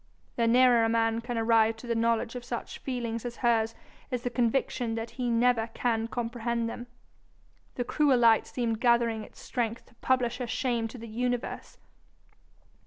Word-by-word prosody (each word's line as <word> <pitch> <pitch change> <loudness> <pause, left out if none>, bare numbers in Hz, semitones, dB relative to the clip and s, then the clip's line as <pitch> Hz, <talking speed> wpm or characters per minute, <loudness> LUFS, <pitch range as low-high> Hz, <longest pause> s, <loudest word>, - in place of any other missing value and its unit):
The 230 -1 +1
nearer 245 0 +5
a 225 - +2
man 225 0 +1
can 240 0 -4
arrive 225 0 +3
to 225 - -11
the 235 - 0
knowledge 230 0 +1
of 250 -1 -6
such 240 -1 -6
feelings 235 -3 -3
as 240 -1 -5
hers 225 -1 +2 0.3
is 245 -1 -3
the 245 - -2
conviction 240 -1 0
that 225 +1 -4
he 250 -2 -3
never 235 -1 +2
can 225 -2 0
comprehend 235 0 -2
them. 240 +1 -6 0.9
The 245 - -1
cruel 275 +1 +2
light 230 -2 +4
seemed 230 -2 -2
gathering 235 -2 +2
its - - -15
strength 230 -2 -3
to - - -24
publish 245 -1 +1
her 250 - -3
shame 235 -1 -1
to 225 - -10
the 230 0 -9
universe. 245 +2 -3
235 Hz, 175 wpm, -28 LUFS, 225-245 Hz, 0.9 s, nearer